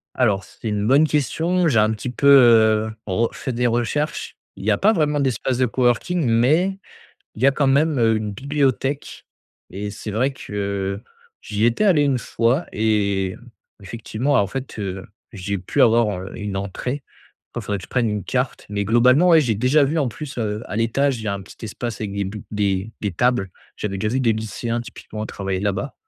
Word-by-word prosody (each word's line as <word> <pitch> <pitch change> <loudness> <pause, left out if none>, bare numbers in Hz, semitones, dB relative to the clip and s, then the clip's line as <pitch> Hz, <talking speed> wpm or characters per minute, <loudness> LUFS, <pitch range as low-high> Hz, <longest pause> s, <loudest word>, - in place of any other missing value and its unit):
Alors 105 -7 +1
c'est 110 - -8
une 105 0 -1
bonne 140 +5 +5
question. 165 +4 +1
J'ai 115 - +3
un 110 0 +4
petit 115 +3 -4
peu, 140 +3 +1
heu, 110 -5 +6
re 110 +5 0
fait 130 - -4
des 125 +1 +1
recherches. 120 +6 -1 0.2
Il - - -9
y 110 - +2
a 105 - +3
pas 215 +2 +4
vraiment 150 -5 +1
d'espace 130 -1 0
de 130 - +3
coworking 130 +7 +1
mais 155 +12 +2 0.6
il 115 - -7
y - - +6
a 140 - +5
quand 140 0 +1
même, 145 +1 +2
heu, 115 -1 +3
une 105 -1 -3
bibliothèque 140 +2 -1 0.5
et 100 +2 -5
c'est 105 +1 -7
vrai 125 +7 0
que, 100 -4 -4 0.4
j'y 105 +1 -1
étais 120 - +2
allé 180 -8 +4
une 140 -3 +2
fois 120 +7 0
et 100 -3 0 0.4
effectivement 115 +6 -3
en 100 -6 +4
fait, 135 0 -6
heu, 95 -1 -5 0.3
j'ai 100 -1 -3
pu 90 - -2
avoir, 115 -1 +4
heu, 95 - -8
une 105 -3 -4
entrée. 125 +8 -4 0.5
Oh - - -3
faudrait 100 -1 -3
que 90 - -10
je - - -15
prenne 120 -3 +1
une 105 -2 -3
carte, 125 0 -2
mais 100 -1 -2
globalement 125 - +4
ouais, 165 - +7
j'ai 120 -7 +1
déjà 130 +8 +3
vu 155 +4 0
en 140 - +1
plus, 140 +3 -8
heu, 105 -2 -2
à - - -5
l'étage, 120 +3 +1
il - - -8
y - - -2
a 100 - 0
un 100 - -5
petit 100 - -12
espace 110 +1 -5
avec 105 -2 -4
des 100 0 -2
bu 100 +2 -6
des 100 -1 -1
des 105 -3 -2
tables. 120 -1 +1 0.3
J'avais 100 -2 -3
déjà 110 +3 -1
vu 130 - +1
des 115 -3 +3
lycéens 115 +2 -3
typiquement 110 -2 -8
travailler 95 -2 -3
là-bas 105 +7 -2
115 Hz, 205 wpm, -21 LUFS, 105-135 Hz, 0.6 s, ouais